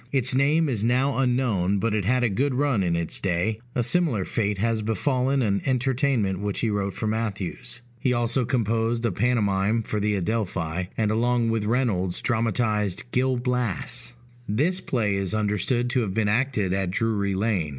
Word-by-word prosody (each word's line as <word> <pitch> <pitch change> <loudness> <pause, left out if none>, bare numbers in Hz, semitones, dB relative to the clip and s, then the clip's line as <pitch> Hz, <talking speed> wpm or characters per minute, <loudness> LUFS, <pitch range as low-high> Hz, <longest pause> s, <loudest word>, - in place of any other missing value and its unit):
Its 130 -1 +2
name 150 +5 +3
is 115 -7 -1
now 130 +4 +2
unknown, 120 -7 +1
but 110 +2 0
it 105 -3 0
had 125 +3 +2
a - - +4
good 130 +6 0
run 135 -5 +1
in 85 -2 +1
its 85 -2 -1
day; 95 +4 -1 0.2
a 125 - +1
similar 125 - +1
fate 105 -3 -1
has 115 +2 0
befallen 130 +5 0
an 100 -3 +1
entertainment 130 -6 +1
which 100 -1 -2
he 115 - +1
wrote 100 -2 -2
for - - -3
Mathews. 110 +1 -3 0.2
He 125 - +1
also 120 +1 +1
composed 115 -1 0
a 115 - +1
pantomime 105 0 +1
for 105 - -2
the 105 0 +1
Adelphi; 95 -4 -2
and, 110 -2 +1
along 120 +1 +1
with 110 -2 -1
Reynolds, 105 -7 0
dramatized 110 -2 0
Gil 130 0 +1
Blas. 120 0 -2 0.3
This 160 - +1
play 110 -6 0
is 100 +1 -1
understood 110 +4 +1
to 125 - +2
have 95 -4 -3
been 110 -2 +1
acted 110 -4 +1
at 95 -2 0
Drury 100 0 0
Lane. 95 -6 0
115 Hz, 175 wpm, -25 LUFS, 100-125 Hz, 0.3 s, a